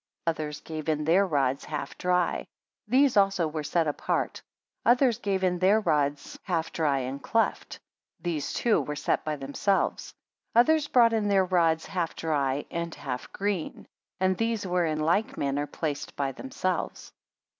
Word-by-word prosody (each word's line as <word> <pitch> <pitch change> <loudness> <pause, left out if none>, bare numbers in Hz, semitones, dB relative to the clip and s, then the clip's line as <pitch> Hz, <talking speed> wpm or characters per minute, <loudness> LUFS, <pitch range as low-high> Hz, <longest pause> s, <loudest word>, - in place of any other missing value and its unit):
7 - - +5
Others 150 -1 -5
gave 155 -1 -5
in 150 -1 0
their 185 +5 +4
rods 140 -4 0
half 150 -2 -5
dry; 180 -1 0 0.4
these 265 +3 +4
also 195 -4 +3
were 155 0 -4
set 165 +3 +1
apart, 150 - -1 0.4
Others 245 -1 +4
gave 195 -2 -1
in 180 -1 +1
their 195 +4 +4
rods 145 -7 -1
half 165 -3 -2
dry 150 -4 +1
and 130 +2 -5
cleft; 225 0 -1 0.4
these 160 -5 -2
too 235 -3 +2
were 150 - -4
set 150 - 0
by 155 -1 -2
themselves. 145 +8 -1 0.4
Others 300 +5 +4
brought 235 -4 +5
in 215 -2 +1
their 195 -2 +3
rods 165 -3 +2
half 175 -4 -2
dry 145 -3 -1
and 170 -1 -3
half 125 -3 -5
green, 195 -5 -3 0.3
and 185 0 +2
these 225 -2 0
were 180 -2 +1
in 155 -1 -1
like 170 +8 +1
manner 140 +1 -1
placed 145 -1 -4
by 140 -1 -1
themselves. 185 - -4
170 Hz, 160 wpm, -27 LUFS, 150-200 Hz, 0.4 s, 7